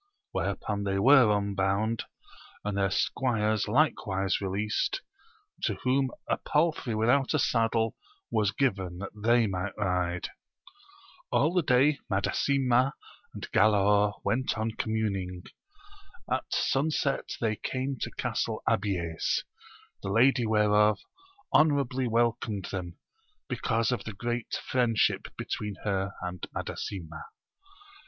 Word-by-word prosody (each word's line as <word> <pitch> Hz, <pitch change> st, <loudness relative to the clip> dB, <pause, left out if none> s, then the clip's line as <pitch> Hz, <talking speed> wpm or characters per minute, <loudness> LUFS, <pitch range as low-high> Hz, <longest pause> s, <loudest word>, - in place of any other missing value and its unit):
Whereupon 100 Hz, -1 st, -2 dB
they 95 Hz, -1 st, 0 dB
were 130 Hz, +2 st, +6 dB
unbound, 100 Hz, +2 st, 0 dB, 0.6 s
and 105 Hz, -1 st, -1 dB
their 100 Hz, -1 st, +2 dB
squires 110 Hz, -1 st, 0 dB
likewise 100 Hz, -8 st, +1 dB
released, 105 Hz, -, -1 dB, 0.6 s
to -, -, 0 dB
whom 130 Hz, +1 st, +2 dB, 0.2 s
a -, -, +1 dB
palfrey. 150 Hz, -7 st, 0 dB
without 125 Hz, +7 st, +2 dB
a -, -, +4 dB
saddle 115 Hz, -3 st, +1 dB, 0.4 s
was 105 Hz, -2 st, +2 dB
given 95 Hz, -8 st, -1 dB
that 100 Hz, -, -7 dB
th6y 115 Hz, +2 st, +3 dB
might 95 Hz, +2 st, -3 dB
ride: 90 Hz, -3 st, -1 dB, 0.5 s
' 390 Hz, -1 st, -26 dB
All 155 Hz, +5 st, +3 dB
the 180 Hz, -, +3 dB
day 140 Hz, +1 st, +3 dB
Madasima 130 Hz, +6 st, +2 dB, 0.4 s
and -, -, -6 dB
Galaor 105 Hz, -1 st, +3 dB
went 115 Hz, +4 st, 0 dB
on 110 Hz, +1 st, -1 dB
co% 110 Hz, -, -4 dB
muning; 95 Hz, -5 st, -2 dB, 0.9 s
at -, -, 0 dB
sunset 140 Hz, 0 st, 0 dB
they 110 Hz, -2 st, 0 dB
came 130 Hz, +4 st, -3 dB
to -, -, -2 dB
Castle -, -, -2 dB
Abies, 90 Hz, -5 st, 0 dB, 0.6 s
the 95 Hz, -, -4 dB
lady 120 Hz, +3 st, +4 dB
whereof 105 Hz, -1 st, +4 dB, 0.6 s
honourably 140 Hz, -4 st, +3 dB
welcomed 115 Hz, -4 st, 0 dB
them, 90 Hz, -3 st, -5 dB, 0.5 s
because 115 Hz, -3 st, 0 dB
of 120 Hz, -6 st, -2 dB
the 110 Hz, -, -5 dB
great 120 Hz, +3 st, -3 dB
friendship 120 Hz, -4 st, +2 dB
between 105 Hz, -1 st, -4 dB
her 100 Hz, -1 st, -1 dB
and 90 Hz, 0 st, -5 dB
Madasima. 85 Hz, -5 st, -5 dB
110 Hz, 120 wpm, -28 LUFS, 100-130 Hz, 0.9 s, were